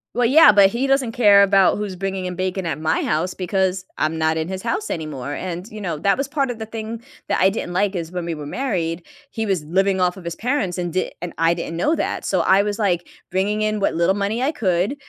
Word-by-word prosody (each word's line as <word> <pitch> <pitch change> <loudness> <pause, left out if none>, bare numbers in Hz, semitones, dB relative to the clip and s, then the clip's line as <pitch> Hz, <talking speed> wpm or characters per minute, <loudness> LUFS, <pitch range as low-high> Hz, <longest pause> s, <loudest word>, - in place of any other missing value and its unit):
Well, 245 -1 +2
yeah, 265 -2 +8
but 200 -1 +6
he 250 +5 -1
doesn't 270 -4 +1
care 205 -4 +6
about 195 -1 +4
who's 205 -3 -4
bringing 195 0 -3
in 180 0 -4
bacon 185 0 -2
at 155 -2 -2
my 160 0 0
house, 175 +4 -1
because 190 0 -1
I'm 155 +1 0
not 160 0 +1
in 160 +1 -2
his 190 0 -5
house 370 - -2
anymore, 145 -4 -4
and, 180 +4 -5
you 215 0 -9
know, 170 -6 -3
that 195 +4 +2
was 275 0 -2
part 280 -2 -1
of 240 -2 -5
the 220 - -4
thing 225 +1 -6 0.2
that - - 0
I 190 - +6
didn't 195 -3 -4
like 195 +1 +1
is 165 -1 -4
when 180 -2 -4
we 170 - -2
were 150 -2 -7
married, 175 - -2 0.3
he 225 -1 -3
was 190 -6 -1
living 190 +4 +1
off 180 +1 +1
of 185 - -10
his 170 0 -5
parents, 220 -8 -1
and 175 -2 -3
d 185 - -1
and 175 -1 -5
I 165 +1 +3
didn't 170 -1 -5
know 305 - +2
that, - - -3
so - - +1
I 195 +1 +4
was, 210 +1 -3
like, 180 -5 0 0.2
bringing 205 +3 0
in 215 0 0
what 200 - 0
little 170 +3 +2
money 205 +4 -1
I 275 - +1
could, 190 - 0
190 Hz, 255 wpm, -21 LUFS, 175-215 Hz, 0.3 s, yeah